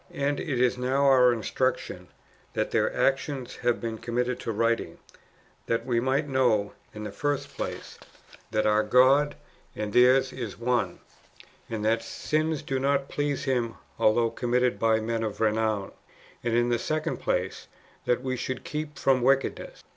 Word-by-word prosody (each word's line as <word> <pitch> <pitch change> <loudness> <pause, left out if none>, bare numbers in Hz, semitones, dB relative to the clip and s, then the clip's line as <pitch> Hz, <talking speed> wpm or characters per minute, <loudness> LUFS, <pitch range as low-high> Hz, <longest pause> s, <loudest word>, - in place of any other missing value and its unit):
And 140 +1 0
it 140 -7 -2
is 125 0 +2
for 125 0 -2
our 135 -3 +5
instruction 115 -5 -2 0.5
that - - -1
their - - +2
actions 135 -1 -1
have 120 -1 0
been 115 -1 -4
com 120 0 -6
mitted 125 0 0
to 115 - -3
w^riting, 115 +2 0 0.7
that 115 - 0
we 120 -2 +1
might 135 +4 0
know, 125 -7 +2 0.2
in 105 - -8
the 105 - -5
first 145 +6 -2
place, - - -6 0.5
that 110 - 0
our 105 0 +4
God 130 +6 +4 0.4
and 105 -1 -4
theirs 130 +1 +5
is 115 -7 -6
one, 120 +1 -1 0.7
and 110 -2 -3
that 115 +1 +2
sins 155 +6 -2
do 135 -1 -2
not 140 0 +1
please 145 -1 -1
Him 120 -4 -1 0.2
although 115 +1 +3
committed 125 0 0
by 110 -1 +3
men 115 +1 -2
of 110 -2 -3
renown; 110 -2 0 0.5
and 120 -1 0
in 120 0 +2
the 120 -1 +1
second 155 +4 -2
place, - - -2 0.4
that 125 +1 +1
we 130 -1 -1
should 130 +1 -4
keep 150 -1 -5
from 130 -2 +2
wickedness. 135 +2 0
125 Hz, 160 wpm, -27 LUFS, 115-135 Hz, 0.7 s, our